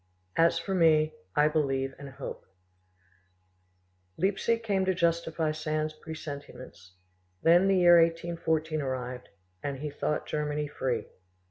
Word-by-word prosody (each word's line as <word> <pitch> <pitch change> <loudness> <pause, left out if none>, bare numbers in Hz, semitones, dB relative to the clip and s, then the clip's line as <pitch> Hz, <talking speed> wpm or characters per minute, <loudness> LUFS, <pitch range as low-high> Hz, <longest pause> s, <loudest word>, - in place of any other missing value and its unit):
As 165 +1 +4
for 195 - -3
me, 155 -3 +4 0.2
I 150 +1 +5
believe 135 -3 0
and 140 -1 -8
hope." 135 - -8 1.7
Leipzig 205 +5 +1
came 200 -4 +1
to 190 0 +1
justify 165 -2 0
Sand's 155 0 -2
presentiments; 140 - -9 0.5
then 175 +3 +6
the 195 -1 +4
year 175 -1 +7
1814 165 -2 0
arrived, 125 -2 -4 0.3
and 140 -1 -3
he 150 +2 -5
thought 150 +1 -2
Germany 150 0 -2
free. 125 -5 -2
155 Hz, 120 wpm, -29 LUFS, 140-170 Hz, 1.7 s, year